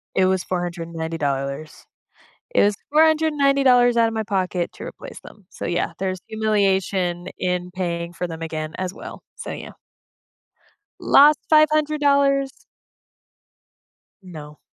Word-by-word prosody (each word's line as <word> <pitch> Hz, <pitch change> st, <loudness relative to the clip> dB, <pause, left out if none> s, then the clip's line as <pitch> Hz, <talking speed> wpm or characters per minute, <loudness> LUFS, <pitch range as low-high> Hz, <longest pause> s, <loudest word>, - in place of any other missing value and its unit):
It 190 Hz, -, +3 dB
was 185 Hz, -1 st, +1 dB
$490. 160 Hz, -5 st, -4 dB, 0.7 s
It -, -, +4 dB
was 205 Hz, 0 st, +2 dB, 0.2 s
$490 280 Hz, -6 st, +4 dB
outta 230 Hz, -1 st, +3 dB
my 220 Hz, -1 st, -2 dB
pocket 185 Hz, -4 st, -2 dB
to -, -, -10 dB
replace -, -, -9 dB
them, 205 Hz, -4 st, -16 dB
so -, -, -7 dB
yeah, 175 Hz, 0 st, -1 dB
there's 185 Hz, -1 st, -3 dB
humiliation 195 Hz, -5 st, 0 dB
in 180 Hz, 0 st, -2 dB
paying 170 Hz, -2 st, -3 dB
for 180 Hz, +1 st, -4 dB
them 165 Hz, -1 st, -8 dB
again, 155 Hz, -1 st, -5 dB
as 185 Hz, 0 st, -3 dB
well. -, -, -10 dB
So, -, -, -7 dB
yeah. -, -, -8 dB, 1.3 s
Lost 295 Hz, +2 st, +6 dB
$500. 295 Hz, -3 st, +3 dB, 1.7 s
No. 150 Hz, -5 st, -11 dB
190 Hz, 115 wpm, -22 LUFS, 170-270 Hz, 1.7 s, Lost